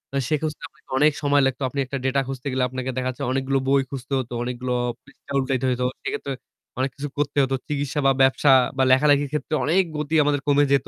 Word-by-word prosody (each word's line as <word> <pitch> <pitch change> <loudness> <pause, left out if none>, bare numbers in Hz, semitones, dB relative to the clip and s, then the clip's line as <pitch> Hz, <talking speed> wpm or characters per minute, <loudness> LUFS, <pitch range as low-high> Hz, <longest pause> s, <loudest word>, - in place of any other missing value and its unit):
আ - - +2
সে 155 - +3
খুঁজতে 155 -1 -4
আপনাকে 150 - -30
অনেক 150 +3 +5
সময় 145 0 +3
লাগতো। 135 0 -1
আপনি 140 +1 -4
একটা 135 +2 -4
data 135 +1 +2
খুঁজতে 135 0 -5
গেলে 130 0 0
আপনাকে 130 +1 -4
দেখা 130 0 -1
যাচ্ছে 125 - -5
অনেকগুলো 135 +1 0
বই 135 0 +4
খুঁজতে 135 0 -6
হত, 125 -2 -5
অনেকগুলো 125 0 -3 0.3
পৃষ্ঠা 140 0 -17
উল্টাইতে 130 -1 -1
হত। 125 0 -2 0.2
সেক্ষেত্রে 140 - -3 0.5
অনেক 130 - +1
কিছু 145 +1 -4
করতে 145 0 -2
হত। 135 - -2 0.2
চিকিৎসা 145 0 -2
বা - - +6
ব্যবসা 135 +1 +4 0.3
বা 135 - +3
লেখালেখির 145 +1 +4
ক্ষেত্রে 150 +1 -3
অনেক 180 +6 +3
গতি 150 +1 -2
আমাদের 145 -1 +1
কমে 145 0 +4
যেত। 135 - +2
140 Hz, 215 wpm, -23 LUFS, 130-145 Hz, 0.5 s, বা